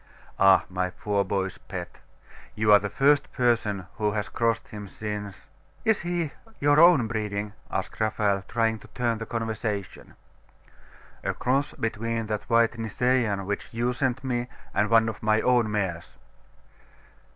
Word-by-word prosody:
'Ah, 95 Hz, -1 st, +6 dB
my 90 Hz, 0 st, -2 dB
poor 100 Hz, +2 st, -1 dB
boy's 95 Hz, -1 st, -2 dB
pet!.... -, -, -7 dB, 0.6 s
You 105 Hz, 0 st, +4 dB
are 105 Hz, -, +8 dB
the 100 Hz, -, -4 dB
first 140 Hz, +6 st, +3 dB
person 110 Hz, -6 st, +1 dB
who 105 Hz, -2 st, 0 dB
has 105 Hz, -1 st, -2 dB
crossed 115 Hz, -1 st, 0 dB
him 105 Hz, -1 st, -8 dB
since 105 Hz, -1 st, -6 dB, 0.2 s
' 75 Hz, 0 st, -33 dB
'Is 220 Hz, -2 st, +3 dB
he 175 Hz, -4 st, -2 dB, 0.2 s
of 225 Hz, -, -22 dB
your 145 Hz, +1 st, +4 dB
own 170 Hz, -7 st, +7 dB
breeding?' 105 Hz, -2 st, -3 dB, 0.2 s
asked -, -, -4 dB
Raphael, 105 Hz, -2 st, +1 dB
trying 115 Hz, -2 st, 0 dB
to -, -, -15 dB
turn 120 Hz, -2 st, 0 dB
the 115 Hz, -, -6 dB
conversation. 110 Hz, -3 st, -4 dB, 1.1 s
'A -, -, -1 dB
cross 135 Hz, +3 st, 0 dB
between 115 Hz, +1 st, -2 dB
that 105 Hz, +1 st, -4 dB
white 115 Hz, 0 st, +3 dB
Nisaean 115 Hz, -3 st, 0 dB
which 100 Hz, +1 st, -3 dB
you 120 Hz, +2 st, 0 dB
sent 130 Hz, 0 st, -1 dB
me, 120 Hz, -2 st, -1 dB, 0.3 s
and 105 Hz, +1 st, +1 dB
one 115 Hz, -1 st, +5 dB
of 110 Hz, -, -5 dB
my 110 Hz, -1 st, +3 dB
own 120 Hz, -3 st, +3 dB
mares. 95 Hz, -5 st, -3 dB
110 Hz, 155 wpm, -26 LUFS, 105-120 Hz, 1.1 s, are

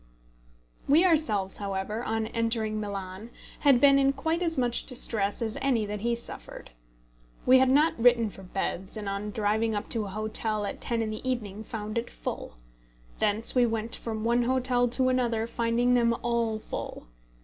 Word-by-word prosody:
We 315 Hz, +6 st, +5 dB
ourselves, 220 Hz, -, +2 dB
however, 200 Hz, +3 st, -3 dB
on 225 Hz, -1 st, -1 dB
entering 225 Hz, -1 st, -1 dB
Milan 200 Hz, 0 st, -6 dB, 0.3 s
had 275 Hz, -4 st, +5 dB
been 275 Hz, 0 st, +6 dB
in 275 Hz, 0 st, +3 dB
quite 320 Hz, +5 st, -1 dB
as 330 Hz, -3 st, 0 dB
much 245 Hz, -2 st, +1 dB
distress 225 Hz, -5 st, -1 dB
as 225 Hz, +4 st, -3 dB
any 250 Hz, -6 st, +1 dB
that 210 Hz, 0 st, -4 dB
he 235 Hz, +3 st, 0 dB
suffered. 235 Hz, -, -8 dB, 0.7 s
We 260 Hz, +1 st, +7 dB
had 260 Hz, 0 st, +4 dB
not 295 Hz, +1 st, +3 dB
written 235 Hz, -3 st, +4 dB
for 195 Hz, -, -12 dB
beds, 190 Hz, +1 st, -4 dB
and 210 Hz, -2 st, -5 dB
on 200 Hz, +1 st, -3 dB
driving 215 Hz, +1 st, 0 dB
up 205 Hz, -, -4 dB
to 225 Hz, -3 st, -1 dB
a -, -, -6 dB
hotel 215 Hz, +1 st, -2 dB
at -, -, -5 dB
ten 230 Hz, -1 st, 0 dB
in 215 Hz, -, -3 dB
the 215 Hz, +4 st, -4 dB
evening 215 Hz, -4 st, -3 dB
found 215 Hz, 0 st, -4 dB
it 235 Hz, -, -6 dB
full. -, -, -6 dB, 0.6 s
Thence 210 Hz, +2 st, +2 dB
we 245 Hz, -2 st, +4 dB
went 225 Hz, 0 st, 0 dB
from 220 Hz, -2 st, -5 dB
one 235 Hz, +1 st, +2 dB
hotel 250 Hz, 0 st, +1 dB
to 255 Hz, +2 st, +1 dB
another, 240 Hz, -3 st, +1 dB
finding 235 Hz, +1 st, +1 dB
them 235 Hz, -1 st, +3 dB
all 235 Hz, -2 st, 0 dB
full. 215 Hz, -, -7 dB
230 Hz, 175 wpm, -28 LUFS, 215-245 Hz, 0.7 s, We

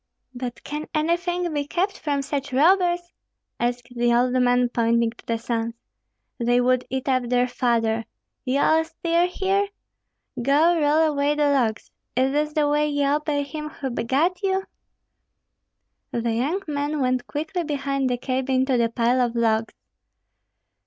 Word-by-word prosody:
"But 245 Hz, -1 st, -6 dB
can 300 Hz, +1 st, -5 dB
anything 345 Hz, +2 st, 0 dB
be 290 Hz, -1 st, -2 dB
kept 385 Hz, +5 st, -1 dB
from 285 Hz, -2 st, -1 dB
such 280 Hz, 0 st, -3 dB
robbers!" 350 Hz, +4 st, +3 dB, 0.5 s
asked 240 Hz, 0 st, -2 dB
the 240 Hz, 0 st, +2 dB
old 245 Hz, +1 st, +3 dB
man, 245 Hz, -1 st, +3 dB
pointing 235 Hz, -1 st, +1 dB
to 235 Hz, -, -18 dB
the 230 Hz, -, 0 dB
sons. 230 Hz, 0 st, -3 dB, 0.6 s
"They 240 Hz, +1 st, +2 dB
would 250 Hz, 0 st, +2 dB
eat 265 Hz, 0 st, -3 dB
up 255 Hz, -2 st, +1 dB
their 250 Hz, 0 st, +2 dB
father. 230 Hz, -3 st, 0 dB, 0.4 s
Ye 260 Hz, +1 st, 0 dB
are 320 Hz, +3 st, +3 dB
still 335 Hz, +1 st, 0 dB
here? 390 Hz, +2 st, 0 dB, 0.7 s
Go 310 Hz, +7 st, +3 dB
roll 305 Hz, +2 st, +3 dB
away 285 Hz, +1 st, +1 dB
the 295 Hz, -1 st, +2 dB
logs. 235 Hz, -6 st, 0 dB, 0.2 s
Is 260 Hz, +2 st, +2 dB
this 300 Hz, +1 st, 0 dB
the 300 Hz, -1 st, +2 dB
way 295 Hz, +1 st, +2 dB
ye 285 Hz, -1 st, 0 dB
obey 290 Hz, 0 st, 0 dB
him 300 Hz, +1 st, -6 dB
who 270 Hz, -3 st, -5 dB
begat 290 Hz, -, 0 dB
you?" 385 Hz, -1 st, 0 dB, 1.5 s
The 235 Hz, 0 st, -1 dB
young 295 Hz, -, -1 dB
men 290 Hz, 0 st, -2 dB
went 255 Hz, -1 st, 0 dB
quickly 320 Hz, +4 st, -3 dB
behind 275 Hz, -3 st, -1 dB
the 245 Hz, -, 0 dB
cabin 260 Hz, +1 st, 0 dB
to 260 Hz, -3 st, +1 dB
the 230 Hz, -1 st, +2 dB
pile 240 Hz, +2 st, +1 dB
of 240 Hz, -1 st, 0 dB
logs. 225 Hz, -1 st, +1 dB
275 Hz, 155 wpm, -23 LUFS, 245-305 Hz, 1.5 s, robbers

